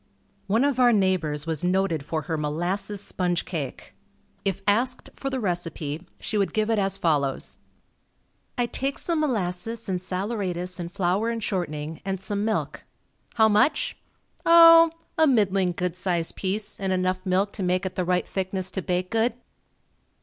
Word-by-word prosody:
One 220 +6 +3
of 280 -3 +1
our 245 -1 +6
neighbors 180 -8 +1
was 160 -2 -2
noted 180 -4 +1
for 155 +1 -3
her 165 - -2
molasses 175 +7 -2
sponge 180 -3 -1
cake. 150 -8 -5 0.5
If 195 0 -2
asked 245 +5 +1
for 275 - -3
the 265 -1 -2
recipe, 170 -4 -3
she 215 - -1
would 200 - 0
give 215 +1 +1
it 220 - +2
as 195 -1 0
follows: 145 -5 0 1.0
"I 245 - +2
take 270 +3 -3
some 335 -2 -1
molasses 225 -4 -2
and 185 -2 -1
saleratus 185 -2 -3
and 170 0 -5
flour 195 +4 0
and 230 -1 -3
shortening, 160 -6 -3
and 195 -1 -2
some 200 +2 -2
milk. 220 0 -2 0.5
How 220 -1 +6
much? 215 +8 +2 0.5
Oh, 330 0 +9 0.3
a 315 - +6
middling 195 -7 +3
good 180 0 -2
sized 175 -3 -1
piece, 200 +2 -3
and 195 -1 -1
enough 185 0 0
milk 190 +2 +1
to - - -4
make 185 +1 +1
it 185 - -3
the 185 - -1
right 180 0 0
thickness 190 -1 -3
to 190 - -3
bake 180 0 -2
good." 225 +1 +2
190 Hz, 165 wpm, -25 LUFS, 180-220 Hz, 1.0 s, Oh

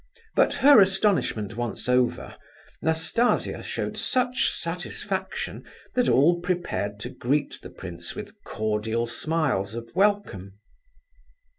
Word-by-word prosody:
But - - +3
her 285 -7 +9
astonishment 190 - +1
once 120 -1 -4
over, 125 0 +1 0.5
Nastasia 160 +9 +1
showed - - -4
such 255 0 +1
satisfaction 470 0 -4 0.3
that 250 -1 +2
all 170 +6 +4
prepared 170 - -2
to - - -4
greet 145 +4 -1
the - - -9
prince 85 0 -8
with 210 0 -7
cordial 110 +2 -1
smiles 115 -5 -1
of 115 0 -7
welcome. 185 - 0
150 Hz, 110 wpm, -25 LUFS, -, 0.5 s, her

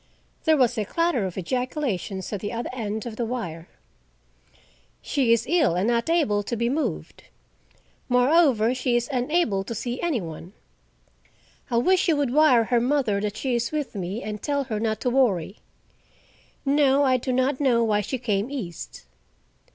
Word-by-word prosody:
There 315 -2 +4
was 245 -4 +2
a - - +1
clatter 335 - 0
of 180 - -8
ejaculations 215 - -3
at 205 - -2
the 205 +2 -4
other 235 0 -4
end 220 -3 -4
of 225 -2 -7
the 240 - -1
wire. 220 -9 -5 1.3
"She 265 -5 0
is 230 - +3
ill, 305 - +2
and 185 +4 0
not 235 +3 +1
able 295 -12 +2
to 220 +4 -4
be 235 +1 0
moved. 300 +4 -3 0.8
Moreover, 250 -2 +4
she 250 -1 0
is 240 0 0
unable 250 - +1
to 230 - -6
see 240 +3 -4
any 325 -8 0
one. 170 +1 -8 1.2
I 235 - +1
wish 370 +10 +3
you 330 - +3
would 280 -4 0
wire 295 -6 +5
her 235 +1 +1
mother 245 -6 +1
that 210 0 -3
she 260 +2 -2
is 235 -1 -1
with 300 -3 -3
me, 195 +2 -4
and 210 -1 -5
tell 285 -1 -1
her 225 -5 -4
not 220 -1 -1
to 250 - 0
worry. 210 -8 +1 1.1
No, 280 0 +3
I 260 -2 +3
do 255 +1 -3
not 260 +2 +1
know 245 -5 +3
why 210 -2 +2
she 260 +6 -3
came 220 -2 -1
east." 205 - -7
240 Hz, 175 wpm, -24 LUFS, 210-275 Hz, 1.3 s, wire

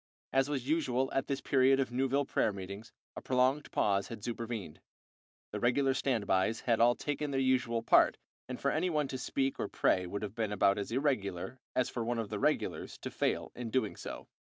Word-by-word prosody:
As 135 +1 +3
was 135 -3 -2
usual 135 -5 +1
at 135 - 0
this 140 -2 -2
period 135 0 +4
of 130 -2 0
Newville 135 +3 +1
prayer 110 - +1
meetings, 100 +3 -8 0.2
a - - -6
prolonged 130 +3 +1
pause 100 -1 +1
had 115 -3 -8
supervened. 115 -8 -5 0.7
The - - -3
regular 135 +2 +2
standbyes 110 -5 +1
had 115 -2 +1
all 120 +1 +5
taken 145 0 -3
their 135 -1 0
usual 130 -3 +1
part, - - +5 0.3
and 130 - -5
for 140 - +1
any 180 +4 +1
one 150 -4 0
to 130 - -4
speak 135 +1 -1
or - - -1
pray 90 -1 +1
would 100 +4 -4
have 105 -2 -4
been 110 -2 -2
about 100 0 +3
as 100 - -4
irregular 120 -4 -1 0.2
as 130 - +2
for 120 - -3
one 120 +1 -1
of 115 -3 -3
the - - -3
regulars - - -1
to - - -6
fail - - -1
in 120 -2 -5
doing 110 -3 0
so. - - -7
125 Hz, 205 wpm, -32 LUFS, 110-135 Hz, 0.7 s, all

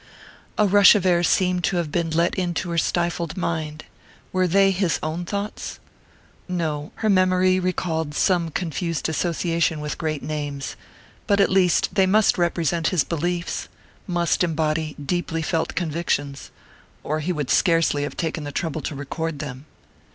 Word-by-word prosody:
_ - - -26 0.5
A 210 - +4
rush 205 +1 +7
of 195 -3 0
air 175 -2 +4
seemed 180 0 +2
to 185 - 0
have 165 -4 -2
been 170 0 0
let 170 +2 +1
into 175 -2 -2
her 170 - -2
stifled 170 0 -1
mind. 155 -3 -3 0.5
Were 185 0 +2
they 195 +2 +4
his 185 -3 +1
own 160 +3 -3
thoughts? 200 +3 -4 0.7
No 160 -5 -2
her - - +4
memory 185 -1 +3
recalled 160 -4 -2
some 175 -2 +2
confused 170 0 -2
association 165 0 0
with 150 0 -5
great 155 -3 -2
names. 145 -3 -4 0.5
But 200 0 +3
at 195 - +4
least 185 -2 +3
they 195 -2 +3
must 210 0 +3
represent 170 -1 +1
his 180 -6 +2
beliefs 170 +1 -2 0.4
must 175 -1 +1
embody 155 -2 -1
deeply 165 +2 -2
felt 165 0 -1
convictions 155 -4 -2 0.5
or 155 +1 -1
he 160 +4 -2
would 150 -6 -2
scarcely 165 -5 +3
have 145 - -4
taken 160 -2 -2
the 145 - -5
trouble 160 +1 -3
to 145 - -4
record 155 +3 -4
them. 140 -1 -7
170 Hz, 160 wpm, -23 LUFS, 155-180 Hz, 0.7 s, rush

